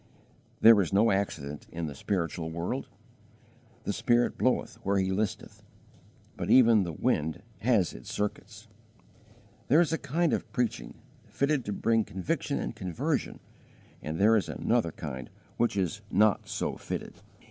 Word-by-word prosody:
There 115 Hz, -2 st, +8 dB
is 85 Hz, -, -2 dB
no 105 Hz, +3 st, +4 dB
accident 75 Hz, -7 st, -3 dB
in 85 Hz, 0 st, -4 dB
the 75 Hz, -, -5 dB
spiritual 85 Hz, +1 st, -2 dB
world. 85 Hz, +2 st, -3 dB, 1.0 s
"The -, -, -2 dB
Spirit 120 Hz, 0 st, +2 dB
bloweth 125 Hz, -2 st, -1 dB
where 100 Hz, 0 st, +1 dB
He 95 Hz, 0 st, +1 dB
listeth," 105 Hz, +2 st, -3 dB, 0.7 s
but -, -, -4 dB
even 115 Hz, -4 st, +6 dB
the 85 Hz, -3 st, -2 dB
wind 80 Hz, +2 st, -1 dB, 0.2 s
has 110 Hz, -6 st, +2 dB
its -, -, -9 dB
circuits. 105 Hz, 0 st, -4 dB, 1.0 s
There 145 Hz, +6 st, +5 dB
is 170 Hz, -2 st, +2 dB
a 160 Hz, -, 0 dB
kind 160 Hz, +4 st, 0 dB
of -, -, -3 dB
preaching, 125 Hz, -5 st, -2 dB, 0.3 s
fitted 140 Hz, -1 st, 0 dB
to 105 Hz, -, -3 dB
bring 115 Hz, +2 st, +2 dB
conviction 95 Hz, -3 st, -2 dB
and -, -, -4 dB
conversion, 90 Hz, -3 st, -2 dB, 0.6 s
and 80 Hz, +1 st, -4 dB
there 110 Hz, +4 st, +5 dB
is 105 Hz, -, 0 dB
another 115 Hz, -8 st, 0 dB
kind 65 Hz, -5 st, -7 dB, 0.3 s
which 120 Hz, -3 st, +1 dB
is 95 Hz, +3 st, -1 dB
not 105 Hz, +1 st, +2 dB
so -, -, -2 dB
fitted. -, -, -6 dB
100 Hz, 145 wpm, -29 LUFS, 85-115 Hz, 1.0 s, There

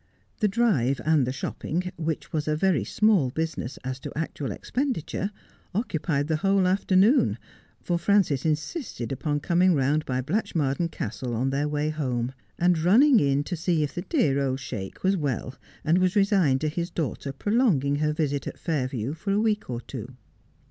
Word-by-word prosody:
The 210 Hz, -, +3 dB
drive 190 Hz, -, +2 dB
and 155 Hz, -5 st, +3 dB
the -, -, 0 dB
shopping, 175 Hz, +6 st, -3 dB
which 160 Hz, -1 st, -4 dB
was 155 Hz, -1 st, -1 dB
a 155 Hz, -, +2 dB
very 160 Hz, -, +2 dB
small 190 Hz, -, +3 dB
business 155 Hz, -3 st, -3 dB
as 130 Hz, +1 st, -4 dB
to -, -, -7 dB
actual 155 Hz, -3 st, -3 dB
expenditure, 240 Hz, -, -2 dB, 0.5 s
occupied 160 Hz, -, 0 dB
the 160 Hz, -1 st, +1 dB
whole 195 Hz, +3 st, +2 dB
afternoon, 195 Hz, +6 st, +3 dB, 0.5 s
for 175 Hz, -1 st, 0 dB
Frances 170 Hz, -7 st, +2 dB
insisted 155 Hz, -, -2 dB
upon 145 Hz, +2 st, -1 dB
coming 175 Hz, +2 st, +3 dB
round 145 Hz, +3 st, +2 dB
by 130 Hz, -1 st, 0 dB
Blatchmardean 160 Hz, -, -1 dB
Castle 125 Hz, -6 st, -4 dB
on 130 Hz, +4 st, 0 dB
their 140 Hz, +2 st, 0 dB
way 150 Hz, +1 st, 0 dB
home, 130 Hz, -5 st, -2 dB, 0.2 s
and 175 Hz, -1 st, +3 dB
running 230 Hz, -, +6 dB
in 140 Hz, 0 st, +2 dB
to 175 Hz, -, -4 dB
see 165 Hz, -2 st, +1 dB
if 145 Hz, -, -3 dB
the 175 Hz, -, -3 dB
dear 165 Hz, -, +1 dB
old 135 Hz, -1 st, 0 dB
Sheik 110 Hz, -8 st, -7 dB
was 190 Hz, +1 st, +3 dB
well, 135 Hz, -, -2 dB, 0.3 s
and 165 Hz, +4 st, +4 dB
was 185 Hz, +1 st, +2 dB
resigned 195 Hz, -10 st, +3 dB
to 155 Hz, -, 0 dB
his 170 Hz, +3 st, -2 dB
daughter 140 Hz, -3 st, -3 dB
prolonging 150 Hz, -, +1 dB
her 150 Hz, +1 st, +1 dB
visit 145 Hz, -3 st, -1 dB
at -, -, -6 dB
Fairview 130 Hz, -5 st, -2 dB
for 170 Hz, +5 st, -6 dB
a 200 Hz, -, +2 dB
week 215 Hz, -, 0 dB
or 120 Hz, -1 st, -3 dB
two. 125 Hz, -1 st, -8 dB
155 Hz, 175 wpm, -26 LUFS, 135-185 Hz, 0.5 s, running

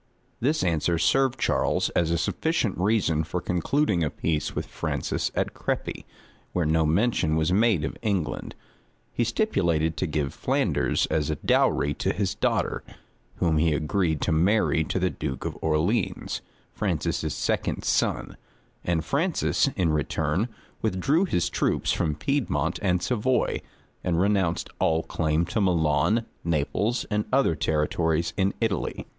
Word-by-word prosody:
This 150 Hz, +6 st, +1 dB
answer 85 Hz, -1 st, +1 dB
served 130 Hz, +9 st, +2 dB
Charles -, -, +1 dB
as 85 Hz, -2 st, +1 dB
a 85 Hz, -, +1 dB
sufficient 125 Hz, -, 0 dB
reason 95 Hz, -6 st, +2 dB
for 90 Hz, +3 st, -3 dB
concluding 90 Hz, -, +1 dB
a 75 Hz, -, +1 dB
peace 80 Hz, 0 st, -2 dB
with -, -, -2 dB
Francis -, -, -2 dB
at -, -, -1 dB
Crepy, -, -, -3 dB, 0.5 s
where 90 Hz, -2 st, +1 dB
no 80 Hz, 0 st, +2 dB
mention 85 Hz, -2 st, +2 dB
was 80 Hz, +3 st, +1 dB
made 105 Hz, -5 st, +3 dB
of -, -, -3 dB
England. 100 Hz, -8 st, -2 dB, 0.6 s
He 120 Hz, -, +1 dB
stipulated 85 Hz, -, +1 dB
to 90 Hz, -, -1 dB
give 75 Hz, -3 st, -2 dB
Flanders -, -, +1 dB
as 75 Hz, -2 st, +1 dB
a 75 Hz, -, 0 dB
dowry 70 Hz, 0 st, +2 dB
to -, -, -1 dB
his 95 Hz, -1 st, -1 dB
daughter, -, -, 0 dB, 0.5 s
whom 80 Hz, -3 st, +1 dB
he 80 Hz, 0 st, +3 dB
agreed 80 Hz, 0 st, 0 dB
to -, -, 0 dB
marry 85 Hz, 0 st, +3 dB
to -, -, -2 dB
the 90 Hz, -1 st, +1 dB
duke 65 Hz, -1 st, -5 dB
of -, -, -3 dB
Orleans, 80 Hz, +9 st, 0 dB, 0.3 s
Francis's -, -, -1 dB
second -, -, -1 dB
son; -, -, 0 dB, 0.5 s
and 85 Hz, -2 st, 0 dB
Francis, 160 Hz, -, +1 dB
in 90 Hz, -5 st, +1 dB
return, 75 Hz, -, 0 dB, 0.3 s
withdrew 125 Hz, -, +2 dB
his 90 Hz, -, 0 dB
troops -, -, 0 dB
from 75 Hz, -3 st, 0 dB
Piedmont 85 Hz, -, -1 dB
and 90 Hz, -3 st, +1 dB
Savoy, 125 Hz, +1 st, +1 dB, 0.4 s
and 85 Hz, -2 st, +1 dB
renounced 95 Hz, -4 st, +1 dB
all 80 Hz, 0 st, +2 dB
claim 80 Hz, +1 st, 0 dB
to 105 Hz, -, -1 dB
Milan, 85 Hz, +4 st, +2 dB, 0.2 s
Naples, 85 Hz, -, 0 dB
and 105 Hz, 0 st, +1 dB
other 135 Hz, -9 st, +3 dB
territories 80 Hz, +1 st, 0 dB
in 95 Hz, 0 st, +1 dB
Italy. 110 Hz, -5 st, -1 dB
85 Hz, 145 wpm, -26 LUFS, 80-105 Hz, 0.6 s, made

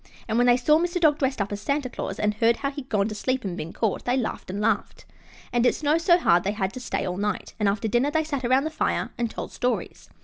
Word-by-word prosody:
And 225 Hz, +1 st, +1 dB
when 245 Hz, -, +4 dB
they 245 Hz, 0 st, +6 dB
saw 300 Hz, +5 st, +4 dB
Mr. 350 Hz, +1 st, -1 dB
Dog 305 Hz, -3 st, +4 dB
dressed 265 Hz, -2 st, 0 dB
up 200 Hz, 0 st, -2 dB
as 205 Hz, 0 st, -4 dB
Santa 280 Hz, -1 st, -1 dB
Claus 245 Hz, -, -5 dB
and 210 Hz, 0 st, +1 dB
heard 225 Hz, +2 st, +3 dB
how 275 Hz, 0 st, -2 dB
he'd 280 Hz, -2 st, -8 dB
gone 200 Hz, -2 st, +1 dB
to -, -, -4 dB
sleep 255 Hz, +4 st, -1 dB
and 185 Hz, -3 st, -3 dB
been 165 Hz, -2 st, -5 dB
caught, 220 Hz, -4 st, -1 dB
they 245 Hz, +1 st, +1 dB
laughed 240 Hz, -6 st, -3 dB
and 195 Hz, +2 st, -4 dB
laughed. 210 Hz, -, -1 dB, 0.5 s
And 240 Hz, -1 st, +3 dB
it 245 Hz, -, +3 dB
snowed 305 Hz, +2 st, +1 dB
so 345 Hz, 0 st, +5 dB
hard 175 Hz, -, +3 dB
that 195 Hz, -, -1 dB
they 205 Hz, -, -2 dB
had 190 Hz, 0 st, -2 dB
to 255 Hz, -, -6 dB
stay 245 Hz, -, -2 dB
all 180 Hz, -1 st, -3 dB
night, 210 Hz, +1 st, -2 dB
and 210 Hz, -2 st, +3 dB
after 210 Hz, +3 st, -1 dB
dinner 240 Hz, +6 st, +2 dB
they 315 Hz, +1 st, +1 dB
sat 285 Hz, -4 st, -3 dB
around 260 Hz, +3 st, +3 dB
the 315 Hz, -, -3 dB
fire -, -, -1 dB
and 235 Hz, -1 st, 0 dB
told -, -, -6 dB
stories. 250 Hz, 0 st, -3 dB
245 Hz, 280 wpm, -25 LUFS, 210-285 Hz, 0.5 s, they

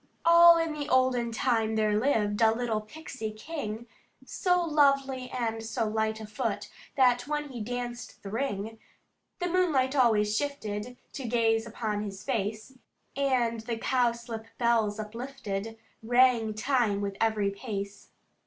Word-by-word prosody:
"All 340 Hz, 0 st, +8 dB
in 330 Hz, -1 st, 0 dB
the 300 Hz, 0 st, -5 dB
olden 255 Hz, -2 st, +2 dB
time, 225 Hz, -1 st, +1 dB
there 215 Hz, -1 st, +2 dB
lived 210 Hz, -3 st, +1 dB
A 220 Hz, -1 st, +6 dB
little 225 Hz, -2 st, -1 dB
Pixie 240 Hz, -1 st, -7 dB
king, 225 Hz, -2 st, -6 dB, 0.4 s
So 360 Hz, -1 st, +1 dB
lovely 275 Hz, -5 st, +2 dB
and 230 Hz, -3 st, -2 dB
so 225 Hz, 0 st, -2 dB
light 220 Hz, 0 st, -1 dB
of 215 Hz, -1 st, -9 dB
foot 220 Hz, -2 st, -3 dB, 0.2 s
That 245 Hz, -2 st, +3 dB
when 295 Hz, 0 st, -2 dB
he 245 Hz, -4 st, -6 dB
danced 245 Hz, +1 st, -5 dB
the 195 Hz, -, -7 dB
ring, 225 Hz, -2 st, -3 dB, 0.6 s
The 355 Hz, -, -2 dB
moonlight 310 Hz, -7 st, +2 dB
always 215 Hz, -5 st, +3 dB
shifted, 245 Hz, -4 st, -3 dB, 0.2 s
to 265 Hz, -4 st, -5 dB
gaze 225 Hz, -1 st, +2 dB
upon 215 Hz, -2 st, -3 dB
his 195 Hz, -2 st, -6 dB
face, 220 Hz, +1 st, -3 dB, 0.4 s
And 255 Hz, -4 st, +1 dB
the 225 Hz, +1 st, -4 dB
cowslip 235 Hz, -2 st, -1 dB
bells 225 Hz, -3 st, +1 dB
uplifted, 225 Hz, -2 st, -5 dB, 0.2 s
rang 235 Hz, -2 st, +3 dB
time 225 Hz, -3 st, +1 dB
with 200 Hz, -1 st, -3 dB
every 215 Hz, -3 st, +2 dB
pace. 200 Hz, -1 st, -6 dB
230 Hz, 140 wpm, -28 LUFS, 215-260 Hz, 0.6 s, All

